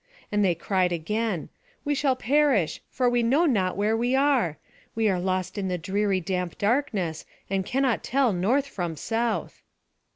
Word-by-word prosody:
And 205 0 +2
they 180 -3 +3
cried 185 +1 0
again: 195 +2 -2 0.4
"We 290 - +1
shall 275 -2 +1
perish, 260 - +2
for 250 -1 0
we 245 0 +2
know 270 +9 +3
not 195 - +1
where 210 +2 +2
we 240 +3 +1
are. 265 - +2 0.4
We 225 -1 +2
are 185 -2 +1
lost 185 +2 -2
in 195 - -2
the 180 -1 -1
dreary 195 +3 0
damp 180 0 -3
darkness, 200 - 0 0.3
and 195 -1 +1
cannot 265 -2 +1
tell 260 -4 +2
north 230 +11 +1
from 175 -11 -4
south." 225 +7 -2
210 Hz, 165 wpm, -26 LUFS, 185-250 Hz, 0.4 s, they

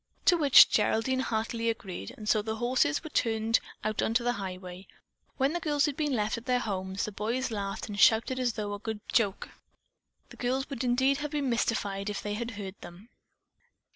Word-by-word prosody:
To 355 - +6
which 290 -5 +8
Geraldine 260 +4 +1
heartily 230 -1 -1
agreed, 190 - -5
and 210 - -9
so 215 0 +3
the 220 +1 -3
horses 240 - +1
were 315 - -8
turned 225 -2 +1 0.2
out 215 0 -1
upon 225 - 0
the 245 +1 +1
highway. 185 -2 -7 0.5
When 270 +3 +1
the 345 - -1
girls 295 -3 +1
had 295 -3 -2
been 300 -2 -1
left 215 +1 -1
at 230 - -19
their 250 -1 +3
homes, 190 -4 -3
the 215 - -5
boys 235 +6 -2
laughed 200 -2 -4
and 205 -1 -6
shouted 230 +5 +4
as 245 -2 0
though 210 -2 -4
at - - -3
a - - -19
good 220 -1 -4
joke. 205 -4 +1 0.8
The - - -14
girls 260 +2 -1
would 260 -2 -3
indeed 260 +3 +2
have 295 +1 -4
been 285 -3 -1
mystified 205 -4 -1
if 205 - -4
they 205 - -3
had 230 +3 -3
heard 195 -1 -7
them. 180 +7 -12
225 Hz, 200 wpm, -29 LUFS, 205-255 Hz, 0.8 s, which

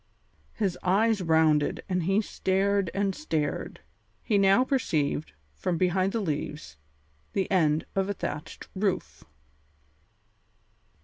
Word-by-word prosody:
His 195 -5 -1
eyes 210 +3 +2
rounded 160 -3 +2
and 180 -2 0
he 195 +4 +3
stared 195 -1 0
and 195 -1 0
stared. 160 - -3 0.4
He 205 -3 +2
now 195 +5 +5
perceived, 160 - -1 0.2
from 170 - -2
behind 185 +2 +2
the 230 - -1
leaves, 150 - -4 0.6
the 195 - +1
end 155 -4 +2
of 195 0 0
a - - 0
thatched 150 -4 -6
roof. 195 -1 -2
190 Hz, 115 wpm, -27 LUFS, 160-200 Hz, 0.6 s, now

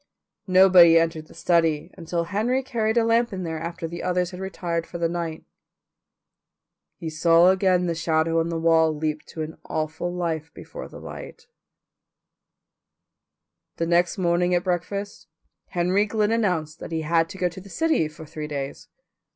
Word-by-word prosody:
Nobody 185 -3 +7
entered 165 -1 0
the - - -17
study 165 -3 +1
until 170 -1 -3
Henry 220 +9 0
carried 225 -3 -1
a 235 - +4
lamp 230 +1 +2
in 185 -2 -4
there 160 -2 -4
after 170 +1 -5
the 170 +1 -7
others 180 0 0
had 180 - -8
retired 175 -3 -3
for 170 - -7
the 170 -1 +1
night. 165 -2 -4 1.5
He 165 - -7
saw 165 +3 +5
again 185 -1 +2
the 170 - 0
shadow 160 0 +1
on 165 +1 0
the 165 - -2
wall 160 -1 +3
leap 155 0 -2
to 160 - -5
an 155 +1 -8
awful 155 +3 -3
life 165 -3 -3
before - - -9
the - - -11
light. - - -10 2.3
The 165 - -1
next 175 +2 +2
morning 175 0 +2
at 175 - +1
breakfast 200 +3 -3 0.4
Henry 185 +3 +1
Glynn 210 0 0
announced 180 -9 0
that - - -8
he 160 -1 -1
had 165 +1 +1
to - - -9
go 180 - +1
to 175 +2 -10
the 200 - -14
city 320 - +1
for 155 +1 -11
three 150 0 -6
days. 140 -2 -5
170 Hz, 165 wpm, -24 LUFS, 160-185 Hz, 2.3 s, Nobody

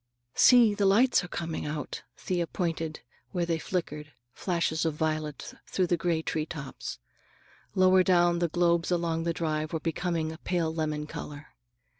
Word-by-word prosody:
"See, 240 -4 +6
the 200 -1 +2
lights 230 +3 +4
are - - -6
coming 165 -3 -4
out." 150 0 -4 0.2
Thea 175 -2 -1
pointed 165 -3 -2
to - - -12 0.3
where 175 -1 0
they 165 -1 -1
flickered, 150 -4 -4 0.2
flashes 170 -3 -1
of 160 -2 0
violet 155 -1 -2
through 185 - +1
the 175 - +2
gray 170 -1 0
tree 155 -1 -2
tops. 150 -5 -6 0.8
Lower 185 0 +6
down 175 -2 +3
the 170 - +2
globes 170 0 +2
along 170 -2 0
the 170 - +1
drives 155 -1 -2
were 160 - 0
becoming 165 0 -1
a 160 - -9
pale 170 -4 -1
lemon 155 -2 -2
color. 150 -1 -8
165 Hz, 165 wpm, -28 LUFS, 155-175 Hz, 0.8 s, See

